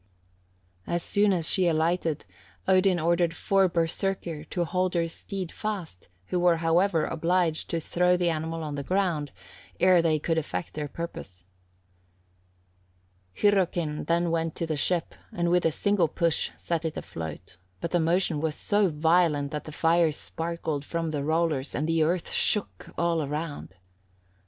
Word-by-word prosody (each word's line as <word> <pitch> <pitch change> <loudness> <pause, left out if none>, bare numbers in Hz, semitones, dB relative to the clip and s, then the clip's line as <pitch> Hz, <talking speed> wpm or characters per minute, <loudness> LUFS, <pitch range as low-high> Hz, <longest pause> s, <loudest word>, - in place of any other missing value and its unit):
As 170 0 -1
soon 205 0 +2
as 170 -4 0
she 185 -2 +3
alighted, 165 -1 0 0.4
Odin 185 -1 +4
ordered 170 +1 +1
four 195 -1 +2
Berserkir 170 -1 -1
to 175 -1 -1
hold 185 +1 -1
her 170 -1 +2
steed 185 +2 -6
fast, 190 - -5 0.2
who 180 - 0
were, 175 -1 +4
however, 165 0 +2
obliged 170 -1 0
to 165 - -1
throw 180 +2 +2
the 175 -1 +1
animal 160 +1 -3
on 150 -1 -4
the 145 - -3
ground 170 -3 0 0.5
ere 180 -1 +5
they 160 -2 +2
could 160 +2 0
effect 160 +1 -5
their 150 -1 -3
purpose. 95 - -8 1.9
Hyrrokin 175 -6 +1
then 170 0 +1
went 165 -1 -1
to 170 - -2
the 160 -1 -2
ship, 170 +3 0 0.2
and 170 0 0
with 180 0 +3
a - - +1
single 200 +1 +2
push 165 +1 0
set 170 -1 -2
it 160 -1 -3
afloat, 80 +2 -7 0.2
but 170 - -4
the 175 - +2
motion 165 -1 +1
was 155 -1 -1
so 205 -1 +2
violent 155 -2 +2
that 150 -1 -4
the 155 - -7
fire 165 +1 +3
sparkled 160 -1 -4
from 165 +1 -3
the 145 -2 -2
rollers, 155 -3 0
and 150 - -1
the 165 0 +2
earth 170 +2 0
shook 210 - 0
all 170 -1 +1
around. 150 - -5
165 Hz, 155 wpm, -27 LUFS, 155-180 Hz, 1.9 s, ere